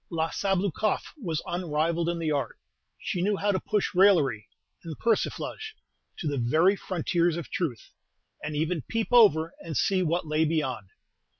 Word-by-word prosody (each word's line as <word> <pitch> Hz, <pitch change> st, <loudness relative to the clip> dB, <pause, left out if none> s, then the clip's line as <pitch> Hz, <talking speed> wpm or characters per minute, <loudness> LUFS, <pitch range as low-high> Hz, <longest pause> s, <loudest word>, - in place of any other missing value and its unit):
La 165 Hz, -1 st, -1 dB
Sabloukoff 195 Hz, +1 st, -1 dB
was 170 Hz, -, -3 dB
unrivalled 170 Hz, -1 st, -1 dB
in 170 Hz, -, -1 dB
the 160 Hz, -2 st, -1 dB
art. 140 Hz, -6 st, -2 dB, 0.4 s
She 180 Hz, -, -3 dB
knew 200 Hz, +2 st, +1 dB
how 205 Hz, +1 st, +1 dB
to 190 Hz, -, 0 dB
push 210 Hz, +1 st, -1 dB
raillery 155 Hz, -, +4 dB, 0.4 s
and 160 Hz, -3 st, -7 dB
persiflage 430 Hz, -, -2 dB, 0.4 s
to 165 Hz, -, -4 dB
the 145 Hz, -2 st, -1 dB
very 160 Hz, +11 st, +3 dB
frontiers 175 Hz, -2 st, 0 dB
of 170 Hz, -, -7 dB
truth, 145 Hz, -11 st, -3 dB, 0.5 s
and 150 Hz, 0 st, -4 dB
even 160 Hz, +2 st, -1 dB
peep 225 Hz, -1 st, -1 dB
over 170 Hz, -9 st, +5 dB
and 160 Hz, -3 st, -5 dB
see 190 Hz, -1 st, +2 dB
what 170 Hz, 0 st, 0 dB
lay 155 Hz, +1 st, +1 dB
beyond. 150 Hz, -10 st, -1 dB
170 Hz, 160 wpm, -27 LUFS, 155-195 Hz, 0.5 s, over